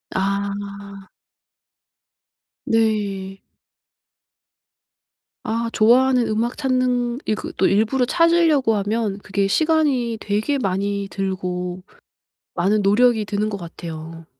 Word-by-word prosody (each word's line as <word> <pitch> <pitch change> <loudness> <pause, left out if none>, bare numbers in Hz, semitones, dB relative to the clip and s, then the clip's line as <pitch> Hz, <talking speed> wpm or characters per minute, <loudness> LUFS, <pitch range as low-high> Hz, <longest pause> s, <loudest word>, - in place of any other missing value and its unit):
아. 200 0 -3 1.6
네. 200 -4 -1 2.0
아 230 +1 -2
좋아하는 245 +2 +4
음악 225 +3 -1
찾는 250 -2 0
이 - - 0
그 - - -7
또 190 - +3
일부러 225 +6 +2
찾으려고 330 -6 +3
하면 205 0 -1
그게 195 0 -1
시간이 275 -2 +1
되게 215 +8 -1
많이 200 -2 -2
들고 185 -2 -4 0.7
많은 205 +4 +2
노력이 220 +2 +3
드는 210 +1 -1
것 205 - -4
같아요. 165 -2 -8
210 Hz, 190 characters per minute, -21 LUFS, 195-245 Hz, 2.0 s, 좋아하는